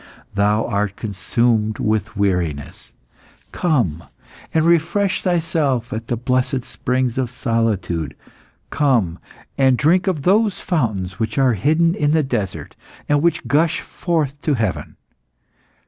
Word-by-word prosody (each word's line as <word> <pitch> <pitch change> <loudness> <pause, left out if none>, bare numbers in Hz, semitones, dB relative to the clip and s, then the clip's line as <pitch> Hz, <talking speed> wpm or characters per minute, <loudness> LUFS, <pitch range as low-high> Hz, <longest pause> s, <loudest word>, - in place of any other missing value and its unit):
Thou 105 +2 +2
art 100 -2 -1
consumed 110 +2 0
with 110 -1 -1
weariness; 90 -8 -2 0.6
come, 115 - 0 0.5
and 160 0 +2
refresh 170 +4 +2
thyself 160 - 0
at 110 +1 -5
the 120 - -1
blessed 130 +2 0
springs 125 0 -1
of 125 -2 -1
solitude; 115 - -1 0.6
come 120 - +1 0.4
and 130 -2 +4
drink 175 +8 +3
of 165 -7 0
those 205 +2 +3
fountains 105 - -2
which 110 +4 -2
are 130 -3 +4
hidden 155 - +2
in 150 -5 +1
the 160 -1 +3
desert, 115 -8 -3 0.3
and 145 -1 +2
which 170 -4 +1
gush 155 +5 +2
forth 150 -5 -2
to 150 - +1
heaven. 110 -5 -2
125 Hz, 125 wpm, -20 LUFS, 105-155 Hz, 0.6 s, and